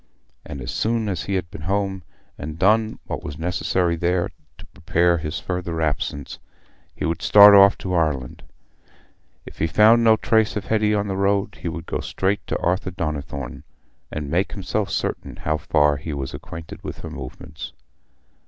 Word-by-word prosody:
And 70 - -8
as - - -4
soon 115 0 0
as 95 -5 -2
he 100 - -1
had 85 -3 -3
been - - -8
home 95 +2 -1 0.3
and 75 +2 -7
done 110 +4 +3
what - - -5
was 70 - -6
necessary 90 +1 0
there 85 +1 0 0.3
to - - -12
prepare 85 +3 +1
for - - -8
his 75 - -3
further 90 -3 -3
absence, 75 -2 -2 0.6
he - - -3
would 80 0 -1
start 105 0 +9
off 100 0 +7
to 95 - -4
Ireland: 75 -7 -1 1.0
if - - -12
he 80 - +2
found 110 +8 +5
no 110 -1 +6
trace 110 -1 +2
of 105 - -3
Hetty 105 -1 +2
on 105 0 0
the 95 - -2
road, 100 +1 0
he - - -4
would 85 0 -5
go - - -3
straight 95 -3 -1
to - - -1
Arthur 95 +2 0
Donnithorne 75 -6 -4 0.5
and 75 -2 -4
make 90 +4 0
himself 100 +1 -2
certain - - -3
how 75 +1 -1
far 75 -1 +2
he 75 +2 -5
was 70 -2 -4
acquainted 80 -1 -9
with - - -7
her - - -7
movements. 65 +4 -8
90 Hz, 180 wpm, -22 LUFS, 75-100 Hz, 1.0 s, start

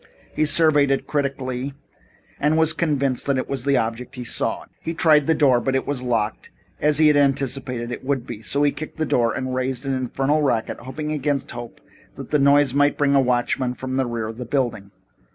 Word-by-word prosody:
He 155 - +1
surveyed 150 -2 +4
it 135 - 0
critically 135 -2 -3 0.6
and 150 +2 +2
was 160 -1 +4
convinced 140 -6 0
that 140 -1 +1
it 130 - -2
was 135 -2 -3
the 140 -1 +3
object 120 +3 -3
he 125 - -6
sought. 120 - -2
He 165 - -5
tried 155 -4 +4
the 160 - +3
door, 130 -5 +3
but 135 -1 -1
it 130 - 0
was 140 -3 -2
locked, 115 -4 -2 0.3
as 150 -1 +3
he 155 - +5
had 150 -1 +5
anticipated 135 -3 0
it - - -6
would 130 -2 -1
be. 120 -4 -8
So 140 +5 0
he 145 - +3
kicked 155 +2 -8
the 160 - 0
door 120 -5 +1
and 130 0 -3
raised 130 0 -2
an 135 - -1
infernal 135 +4 0
racket, 120 -6 -1
hoping 150 +5 -5
against 145 -2 -2
hope 120 -1 -9 0.4
that - - -9
the 150 - +3
noise 140 -1 +4
might 145 +1 +2
bring 140 -1 +2
a 140 - +5
watchman 125 0 0
from 130 0 -5
the 135 -1 0
rear 115 -2 -3
of 110 +1 -7
the 125 - -5
building. 120 -6 -2
135 Hz, 215 wpm, -22 LUFS, 125-145 Hz, 0.6 s, he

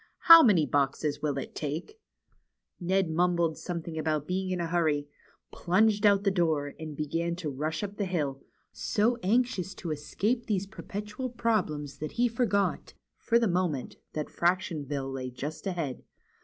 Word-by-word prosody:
How 330 -1 +11
many 195 - +5
boxes 145 +1 0
will 145 -2 -1
it 135 - -5
take? 160 - -5 0.4
" - - -53 0.3
Ned 185 -1 +1
mumbled 170 -1 +2
something 170 -2 -5
about 155 -2 -1
being 185 +2 -2
in 185 -1 -1
a 170 - -1
hurry, 160 -4 +1 0.4
plunged 205 +4 +3
out 200 -1 +4
the 200 - +3
door, 160 -6 0
and 155 -2 -7
began 165 +3 -1
to 165 -4 -4
rush 155 +6 -3
up 205 0 -5
the 205 - 0
hill, 150 -7 -2 0.3
so 230 +3 +1
anxious 200 -3 0
to 170 -4 -5
escape 205 - -1
these 200 -3 0
perpetual 210 +4 -6
problems 190 - -1
that 155 - -5
he 245 +1 +2
forgot, 225 -4 0 0.2
for 235 - +2
the 235 -1 +2
moment, 175 -7 -1 0.2
that 150 -1 -2
Fractionville 150 -7 -1
lay 130 -1 -4
just 145 +9 -6
ahead. 165 -8 -3
175 Hz, 160 wpm, -29 LUFS, 150-200 Hz, 0.4 s, How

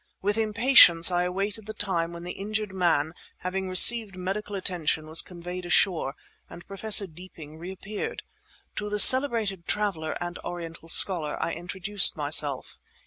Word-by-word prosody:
With 205 +2 -3
impatience 220 -6 +4
I 175 0 -1
awaited 200 +4 -5
the 215 - -9
time 170 -5 -3
when 170 0 -11
the 180 - -7
injured 210 +1 -6
man, 165 -4 -2 0.3
having 190 +1 -6
received 210 +2 +6
medical 195 +3 -7
attention, 170 -5 -3
was 160 +1 0
conveyed 180 0 -10
ashore, 175 -5 -1 0.3
and 170 - -14
Professor 200 +1 0
Deeping 160 -3 -15
reappeared. 195 - -8 0.5
To 210 0 -5
the 210 - -4
celebrated 225 -7 +5
traveller 190 -7 -4
and 175 0 -8
Oriental 165 -1 -10
scholar 165 -4 +3
I - - -4
introduced 190 +2 +1
myself. 145 -2 -2
185 Hz, 140 wpm, -24 LUFS, 170-205 Hz, 0.5 s, received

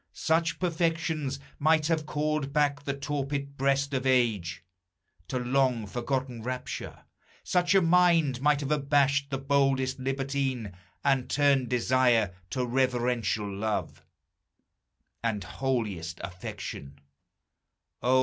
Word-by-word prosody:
Such 165 0 +1
perfections 165 -5 -1 0.2
Might 155 +1 +3
have 160 -2 0
called 150 -2 -1
back 145 -1 +1
the 140 - -1
torpid 140 0 -3
breast 140 +1 +1
of 130 0 0
age 110 -9 +1 0.6
To 130 - -2
long 125 -2 +1
forgotten 125 +2 -3
rapture; 125 +2 -5 0.4
such 180 +1 +2
a 190 - +5
mind 165 -6 +4
Might 150 0 +3
have 140 0 -3
abashed 140 -1 +2
the 135 - -2
boldest 135 -1 +1
libertine 135 -5 -2 0.3
And 135 -2 +2
turned 140 -4 +3
desire 125 -4 +3 0.2
to 125 +5 -1
reverential 120 -4 0
love 105 +2 -3 1.2
And 110 -4 -1
holiest 100 -9 -3
affection! 70 -6 -7
135 Hz, 110 wpm, -28 LUFS, 120-145 Hz, 1.2 s, a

